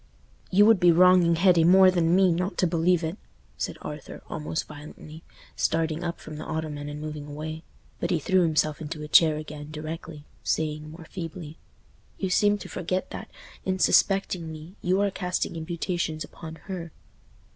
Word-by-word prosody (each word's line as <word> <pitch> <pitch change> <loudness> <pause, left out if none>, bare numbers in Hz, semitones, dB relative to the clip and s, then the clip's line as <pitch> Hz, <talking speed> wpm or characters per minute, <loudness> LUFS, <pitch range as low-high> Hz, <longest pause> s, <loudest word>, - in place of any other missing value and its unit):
"You 205 +2 +6
would 225 -3 +6
be 175 0 +6
wronging 180 0 +6
Hetty 175 -1 +5
more 185 +2 +7
than 170 -1 +2
me 190 -1 +5
not 180 +4 -1
to - - +3
believe 170 +1 +2
it," 160 +6 -3 0.4
said - - -4
Arthur, - - -8
almost 80 +2 -3
violently, 150 +1 -11 0.3
starting 160 0 0
up 170 -1 -3
from 155 -1 -9
the 155 - -6
ottoman 155 -2 -4
and 145 0 -6
moving 150 -1 -6
away. 155 +2 -6 0.4
But - - -2
he 175 - +2
threw 185 +5 +2
himself 155 -2 +1
into 150 0 -5
a - - -6
chair 155 0 +5
again 150 -1 -8
directly, 155 0 -7 0.2
saying, 155 -1 -1
more 160 +1 -11
feebly, 165 -2 -7 0.6
"You 190 -2 -2
seem 205 +2 +3
to - - -9
forget 185 +1 -3
that, - - -7 0.3
in 190 0 -1
suspecting 185 -3 +2
me, 155 +3 -10
you 185 +2 +1
are 200 -1 +1
casting 180 -2 -2
imputations 165 -1 -3
upon 160 -1 -9
her." 175 -4 -6
165 Hz, 170 wpm, -26 LUFS, 155-180 Hz, 0.6 s, more